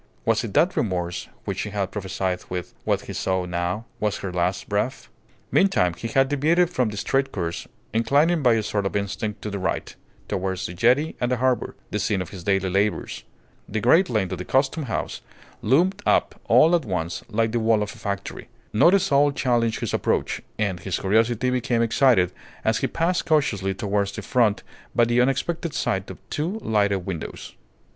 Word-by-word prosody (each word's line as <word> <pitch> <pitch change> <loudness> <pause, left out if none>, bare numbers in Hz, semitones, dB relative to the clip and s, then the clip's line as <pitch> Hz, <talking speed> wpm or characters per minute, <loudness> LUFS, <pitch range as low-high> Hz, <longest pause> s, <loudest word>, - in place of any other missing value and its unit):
Was - - +2
it - - -6
that - - +3
remorse 90 -4 -2 0.2
which - - -3
she 105 - -2
had 100 -2 -2
prophesied 95 -2 -2
with, 90 -1 -5
what - - +1
he - - -8
saw 95 -1 -1
now, 90 +5 -2
was 105 -1 0
her 95 -2 -5
last 90 +2 -1
breath? 105 +6 -2 0.4
Meantime, 185 - +3
he 115 - -5
had 135 +4 +3
deviated 160 +5 +2
from 125 -9 +1
the 105 - -7
straight 135 +5 0
course, 85 -3 -4 0.3
inclining 145 +9 +3
by 125 -4 +5
a 110 - 0
sort 100 -1 -1
of - - -6
instinct 100 +1 -3
to 105 - -4
the 100 - -3
right, 95 +1 -2 0.3
towards 95 0 -2
the 90 - -5
jetty 125 - +2
and 120 0 +1
the 125 - +2
harbour, 130 0 0 0.2
the 105 - -1
scene 100 0 0
of 90 - -5
his 95 -4 -9
daily 95 0 +1
labours. 95 - -1 0.4
The 110 - -1
great 165 - +4
length 105 -5 0
of 95 - -4
the - - -3
Custom 135 - +1
House 115 - -3 0.4
loomed 180 - +2
up - - +2
all 165 +3 +5
at 170 - 0
once 90 -6 -3
like 115 0 +1
the 120 - 0
wall 110 -1 +3
of 105 - -6
a - - -15
factory. 100 0 -5 0.3
Not 170 - +6
a - - +5
soul 145 -4 +3
challenged 120 -4 0
his - - -2
approach, - - 0 0.2
and 100 -4 -1
his 90 +2 -2
curiosity 115 +5 +2
became 120 -2 +1
excited 115 -6 +3 0.3
as - - +2
he - - 0
passed 175 +2 0
cautiously 110 - +1
towards 100 0 -1
the - - -6
front 115 -5 +2 0.3
by 120 - +5
the 120 +1 +3
unexpected 145 +5 -1
sight 95 -1 -1
of - - -8
two 170 +8 -2
lighted 100 -4 +1
windows. 90 -5 -6
110 Hz, 195 wpm, -24 LUFS, 95-130 Hz, 0.4 s, Not